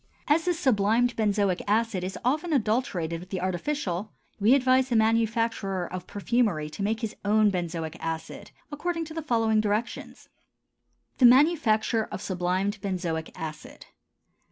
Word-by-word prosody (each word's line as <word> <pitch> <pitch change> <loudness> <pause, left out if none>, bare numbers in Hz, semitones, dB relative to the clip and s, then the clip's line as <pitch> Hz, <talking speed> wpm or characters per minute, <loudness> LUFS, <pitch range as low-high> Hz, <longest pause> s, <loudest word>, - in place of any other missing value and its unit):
As 320 +2 +3
this 355 -2 +1
sublimed 235 - +2
benzoic 200 -4 +1
acid 215 -2 +1
is 185 +1 -4
often 310 +7 0
adulterated 210 - 0
with 180 +2 -12
the 185 - -3
artificial, 185 - -2 0.3
we 220 +6 +5
advise 260 -1 +3
the 240 - 0
manufacturer 225 -4 +1
of 185 +1 -7
perfumery 205 -8 0
to 200 - -7
make 220 +3 -1
his 225 -2 -4
own 210 0 +3
benzoic 170 -3 -3
acid 160 0 -5 0.2
according 330 +3 -3
to 315 - -9
the 325 - -4
following 225 -6 +2
directions. 215 +2 -3 0.9
_The 250 - +8
Manufacture 240 -6 +3
of - - -7
Sublimed 190 +1 -2
Benzoic 175 -5 -3
Acid. 155 -3 -8
215 Hz, 140 wpm, -26 LUFS, 185-245 Hz, 0.9 s, The